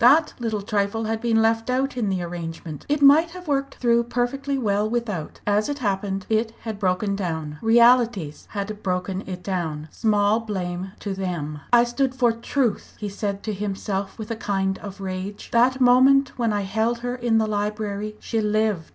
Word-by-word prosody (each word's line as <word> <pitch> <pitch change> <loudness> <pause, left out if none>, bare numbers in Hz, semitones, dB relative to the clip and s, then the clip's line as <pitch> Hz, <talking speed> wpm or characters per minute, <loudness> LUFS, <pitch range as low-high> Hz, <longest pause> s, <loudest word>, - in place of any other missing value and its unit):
That 310 +1 +4
little 220 -4 -2
trifle 205 +2 0
had 220 0 -2
been 225 -2 +3
left 225 +1 +1
out 265 +2 0
in 230 -5 0
the 185 -2 -1
arrangement. 165 -2 -6
It 290 0 +1
might 305 +4 +7
have 360 -2 -11
worked 275 -1 -1
through 235 -1 +2
perfectly 270 +4 -1
well 210 -3 +1
without; 215 -9 -3
as 210 +4 +2
it 290 - -2
happened 195 -4 -2
it 225 +1 0
had 220 -3 -5
broken 200 +1 0
down. 160 -6 -4
Realities 230 -8 +3
had 205 0 -4
broken 185 0 -2
it 180 -1 -6
down. 160 -5 -3
Small 210 0 +2
blame 190 -4 -4
to 200 - -3
them! 170 -6 -4
"I 240 -1 +7
stood 255 +2 -1
for 245 -2 +3
truth!" 230 0 -1
he 210 - -3
said 200 0 -3
to 215 - -2
himself 200 -1 -3
with 220 0 -6
a - - -1
kind 195 -3 -1
of 200 -1 -9
rage 190 +2 -5
"that 250 +3 +3
moment 265 +2 +6
when 230 -3 0
I 205 -1 0
held 220 +4 -1
her 245 - -1
in 240 -2 +1
the 220 - +3
library, 210 0 -2
she 225 -2 -1
lived. 210 -5 0
215 Hz, 185 wpm, -24 LUFS, 195-240 Hz, -, might